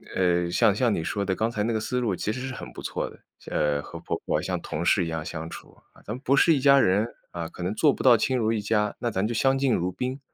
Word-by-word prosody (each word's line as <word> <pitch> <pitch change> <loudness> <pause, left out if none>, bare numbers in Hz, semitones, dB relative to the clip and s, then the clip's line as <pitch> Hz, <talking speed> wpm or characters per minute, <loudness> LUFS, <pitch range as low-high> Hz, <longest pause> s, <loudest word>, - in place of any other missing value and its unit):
呃， 90 -2 +2
像 100 +3 +4
像 120 0 +2
你 80 - -2
说 100 +4 -2
的， 95 -1 0
刚 115 +1 0
才 105 -2 -2
那 115 - 0
个 110 - 0
思 125 +3 -2
路 110 -6 0
其 105 - -2
实 130 +2 -5
是 130 - -5
很 - - -8
不 - - -8
错 - - -3
的， - - -16 0.3
呃， 75 -1 +1
和 - - -9
婆 - - -3
婆， - - +1
啊， - - -4
像 - - -2
同 80 +3 -4
事 90 -1 +3
一 80 - -4
样 80 -1 -3
相 80 0 -5
处， - - -11 0.3
咱 105 - -4
们 130 - -10
不 140 - +4
是 165 - +5
一 145 - +1
家 140 0 +6
人， 105 0 +3 0.2
啊， 85 -1 -4
可 - - -11
能 90 +4 -1
做 150 +2 +4
不 - - -6
到 125 -3 +7
亲 130 +3 0
如 110 -2 +1
一 110 - 0
家， 105 0 0
那 120 - -1
咱 95 +1 0
就 120 - -3
相 135 +4 +3
敬 135 -3 +2
如 90 +2 -1
宾， 130 +7 -4
105 Hz, 320 characters per minute, -26 LUFS, 90-125 Hz, 0.3 s, 到